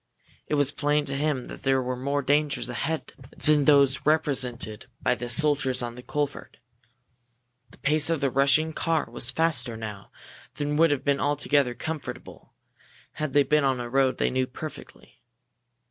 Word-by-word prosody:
It - - 0
was 145 -1 +3
plain 145 0 0
to 135 - -3
him 145 -3 -1
that - - -9
there 135 -1 +2
were 130 0 -2
more 140 +3 -2
dangers 140 -3 +1
ahead 160 +6 -3 0.2
than 150 -2 +3
those 140 -2 +4
represented 130 -8 0
by - - +1
the 120 -1 -5
soldiers 135 -2 +2
on 120 -1 -4
the 125 - -10
culvert. 145 +2 -4 1.1
The - - -18
pace 150 +2 +2
of 165 -2 +1
the 140 -2 0
rushing 140 +4 +3
car 160 -2 0
was 120 +1 -1
faster 130 -6 +1
now 105 -3 -8 0.5
than 145 0 -2
would 165 +1 +5
have 145 -2 -1
been 140 -1 +2
altogether 145 -3 +1
comfortable 160 +2 -7 0.7
had 155 -2 -2
they 145 -1 +5
been 150 +2 +2
on 135 -2 +1
a 120 - -4
road 135 -1 +2
they - - 0
knew 130 0 0
perfectly. 155 +4 -11
140 Hz, 165 wpm, -26 LUFS, 125-150 Hz, 1.1 s, would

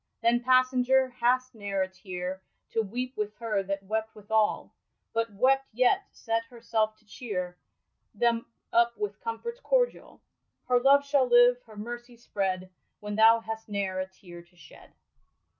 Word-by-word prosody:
Then, 240 +1 +3
passenger, 255 +1 +4
hast 255 +1 +1
ne'er 200 -3 -2
a - - -3
tear 185 0 -6 0.3
To 225 - +1
weepe 250 +5 -4
with 210 0 -3
her 220 -4 -1
that 195 0 -4
wept 220 +2 -3
with 210 0 -15
all; 220 -1 +1 0.4
But 230 0 0
wept, 265 +6 +2
yet 255 - +3
set 225 -1 -1
herselfe 230 -2 -1
to 215 - -31
ohere 185 -5 -5 0.5
Them 235 -1 +1 0.3
up 235 0 +3
with 415 +3 -4
comforts 470 0 -5
cordiall? - - 0 0.5
Her 250 -1 +4
love 280 +2 +5
shall 280 -2 +3
live, 245 0 +6
her 215 -1 -14
mercy 240 +2 -7
spread, 190 -5 -3 0.3
When 210 0 -6
thou 225 +1 +6
hast 220 0 -6
ne'er 195 -2 -2
a 185 - -2
tear 180 -2 -13
to 175 +1 -25
shed." 170 - -16
230 Hz, 160 wpm, -28 LUFS, 205-250 Hz, 0.5 s, live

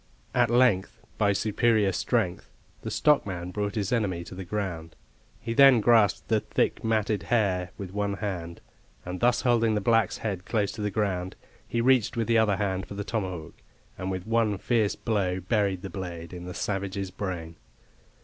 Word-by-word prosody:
At 120 -2 +3
length, 120 -5 +2 0.2
by 100 -2 +4
superior 105 0 +2
strength, 95 -1 -1 0.3
the - - -5
stockman 95 -12 +1
brought 105 +1 -3
his 100 -3 -1
enemy 100 -8 0
to - - -10
the 95 +1 -6
ground. 85 -4 -4 0.4
He 115 - -4
then 135 -1 +7
grasped 110 -2 +3
the 110 -2 +2
thick, - - -1
matted 110 -2 +1
hair 95 -7 0
with 95 -2 -7
one 100 0 -1
hand, 90 -5 -5 0.4
and 90 +1 -5
thus 120 +1 +3
holding 115 -3 +2
the - - +1
black's 115 +2 +2
head 100 -5 -3
close 105 -1 0
to 110 - -7
the 105 - 0
ground, 95 -3 -2 0.3
he 115 - -1
reached 125 -3 +3
with 115 - +1
the 115 0 +3
other 105 -3 +3
hand 95 -1 -2
for 100 - -8
the 100 - -3
tomahawk, 95 - -4 0.3
and 95 +1 -4
with 95 -1 -4
one 110 -2 +1
fierce 110 0 +1
blow 95 -5 -1
buried 95 -1 0
the 95 - -5
blade 85 -3 -6
in 90 0 -7
the 90 - -7
savage's 95 -1 -3
brain. 85 -4 -5
100 Hz, 180 wpm, -27 LUFS, 95-115 Hz, 0.4 s, then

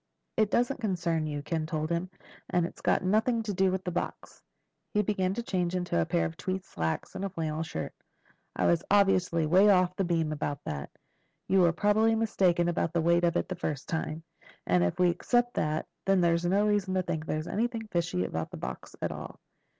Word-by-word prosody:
"It 215 -2 +2
doesn't 245 +4 +1
concern 170 -6 0
you," 145 -1 -4
Ken 160 0 -2
told 155 0 -2
him. 170 +2 -1 0.4
"And 175 -1 +2
it's - - -9
got - - +2
nothing 220 +5 +2
to 210 -2 -3
do 190 0 +2
with 190 0 -2
the 180 - -3
box." 175 - -5 0.5
He 210 - +4
began 190 -2 0
to 235 - -3
change 180 -4 -1
into 175 - 0
a 80 - -1
pair 85 - +1
of 80 0 -4
tweed 185 0 -3
slacks 80 - -3
and 190 - -5
a 195 - -1
flannel 160 -3 -3
shirt. 80 - -4 0.6
"I - - +1
was 170 -1 +3
obviously 185 -5 +3
way 185 +6 +5
off 185 -2 +4
the 195 - 0
beam 165 -3 0
about 145 -1 -2
that. 70 -2 -4 0.6
You 190 - +4
were 170 -2 +5
probably 210 +5 +3
mistaken 185 -6 +2
about 170 -1 0
the 170 - +2
weight 170 +1 +3
of 170 0 +2
it - - -1
the - - -3
first 155 -5 -4
time, 160 -1 -3 0.4
and 90 -1 +3
if 85 - 0
we 180 -1 +4
accept 240 +7 +1
that, 155 +1 -1 0.2
then 195 -1 +4
there's 170 0 +2
no 195 +4 +3
reason 205 -3 +1
to 185 - +1
think 160 -2 -3
there's 155 0 -2
anything 230 +2 -2
fishy 165 - 0
about 80 -2 -3
the - - -8
box 65 0 -7
at - - 0
all." - - -8
175 Hz, 210 wpm, -29 LUFS, 160-195 Hz, 0.6 s, way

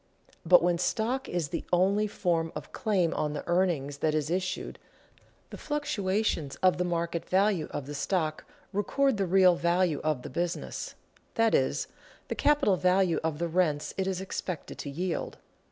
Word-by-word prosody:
But 175 0 +6
when 175 -1 +2
stock 240 +8 -1
is 170 -5 -2
the - - -3
only 195 +4 +3
form 170 -5 -1
of - - -7
claim 195 -8 +1
on 150 -1 -1
the 150 - -4
earnings 170 -6 0
that 155 -1 +1
is 155 +1 -1
issued, 185 +1 -2 0.7
the - - -8
fluctuations 210 - -1
of 180 -1 +4
the - - +2
market 170 -1 -2
value 190 -3 +2
of 145 -2 -5
the 145 - -7
stock 155 +1 -1 0.3
record 260 +5 +1
the 195 -2 0
real 185 0 +5
value 170 -2 +1
of 155 -5 0
the - - -6
business, 175 +5 -3 0.4
that 225 -1 +3
is, - - +2 0.4
the - - 0
capital 290 -10 +3
value 185 -1 +2
of 160 -2 -1
the 170 +2 -1
rents 160 -4 0
it 190 -1 -1
is 190 -1 -1
expected 180 -3 -5
to 145 - -5
yield. 170 +4 -3
180 Hz, 170 wpm, -29 LUFS, 160-195 Hz, 0.7 s, But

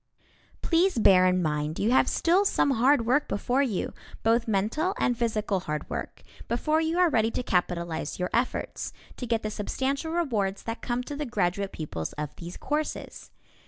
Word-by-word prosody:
Please 350 -1 +2
bear 185 -4 +6
in 180 0 +2
mind 150 0 -1
you 215 +4 +1
have 260 - +4
still 355 +4 +3
some 335 -7 +2
hard 260 0 +3
work 260 +5 +2
before 245 +6 0
you, 230 -10 -1 0.3
both 230 +1 +2
mental 225 - 0
and 245 - +1
physical 215 -4 0
hard 150 -4 -4
work, - - -5 0.2
before 305 +7 +1
you 325 +2 0
are 360 -1 +5
ready 225 -7 +2
to 250 - -3
capitalize 170 -5 -1
your 180 0 -2
efforts, 240 +2 -1 0.2
to 250 - -6
get 230 -1 0
the 215 - -2
substantial 270 +9 -2
rewards 220 - -1
that 225 +1 -5
come 245 0 -2
to 290 - -6
the 300 - -3
graduate 200 -3 -1
pupils 85 - -5
of 150 -1 -5
these 175 +1 -8
courses. 300 +1 -4
230 Hz, 175 wpm, -27 LUFS, 185-280 Hz, 0.3 s, bear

